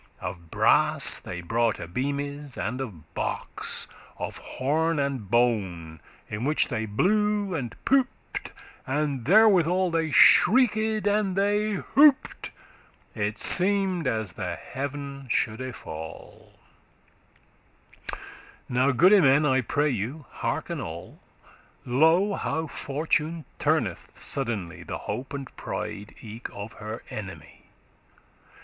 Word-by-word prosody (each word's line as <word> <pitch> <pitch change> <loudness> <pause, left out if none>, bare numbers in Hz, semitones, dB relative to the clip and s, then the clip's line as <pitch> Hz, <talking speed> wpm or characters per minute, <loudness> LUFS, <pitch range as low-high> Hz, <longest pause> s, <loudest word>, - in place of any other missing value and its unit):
Of 90 -2 -7
brass - - +3
they 90 - -7
broughte 105 -3 -1
beames* 140 +2 -3
and 130 +1 -3
of 85 - -9
box, - - -2
*trumpets - - -21 0.2
<36> - - -3
Of - - -11 0.2
horn 155 +5 +1
and 140 -8 -2
bone, 95 -9 0 0.3
in 105 +2 -5
which 150 +3 +2
they 110 -2 -2
blew 205 - +1
and 120 -8 -4
pooped,* 265 -1 +1
tooted - - -9 0.4
And 140 -3 -1
therewithal 185 - +5
they 165 -1 0
shrieked 220 - +5
and 205 -2 +1
they 205 +2 +1
hooped; 275 +8 +3 0.6
It 105 0 -2
seemed 185 -4 +3
as 110 -5 -1
the - - -4
heaven 140 0 -6
shoulde 120 +3 -1
fall 80 0 -10 2.1
Now, 125 +2 +2
goode 185 - +6
men, 140 0 +5
I 130 -2 +3
pray 145 +5 0
you 130 +7 -4
hearken - - -3
all; - - -8 0.7
Lo, 160 +10 +3
how 160 -4 -2
Fortune 155 +2 -2
turneth - - 0
suddenly 105 -11 -3
The - - -5
hope 130 +2 -5
and 140 -2 -7
pride 100 +1 -6
eke 115 +2 -7
of 100 +2 -8
her 110 +2 -7
enemy. 100 -3 -9
140 Hz, 115 wpm, -26 LUFS, 110-175 Hz, 2.1 s, goode